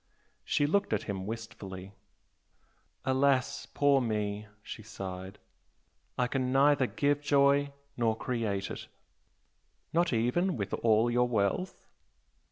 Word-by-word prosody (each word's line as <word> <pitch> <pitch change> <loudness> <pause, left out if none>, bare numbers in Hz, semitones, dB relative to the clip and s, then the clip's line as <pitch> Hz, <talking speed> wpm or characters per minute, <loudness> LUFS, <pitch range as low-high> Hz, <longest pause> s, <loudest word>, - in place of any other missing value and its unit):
She 145 - +1
looked 200 +7 +1
at - - 0
him 95 -2 -4
wistfully. 100 -4 -7 1.1
"Alas, 130 -1 +1
poor 140 -1 +3
me!" 105 -2 -2 0.2
she - - -8
sighed 95 -3 -7 0.8
"I 125 - +2
can 130 0 -1
neither 140 0 +4
give 145 +2 0
joy 140 0 +3 0.2
nor 115 -3 +1
create 110 -6 -2
it!" - - -7 1.1
"Not 170 0 +2
even 125 +10 +1
with 100 -3 -4
all 115 +1 +3
your 125 +1 +3
wealth?" 115 - -1
120 Hz, 115 wpm, -30 LUFS, 105-140 Hz, 1.1 s, neither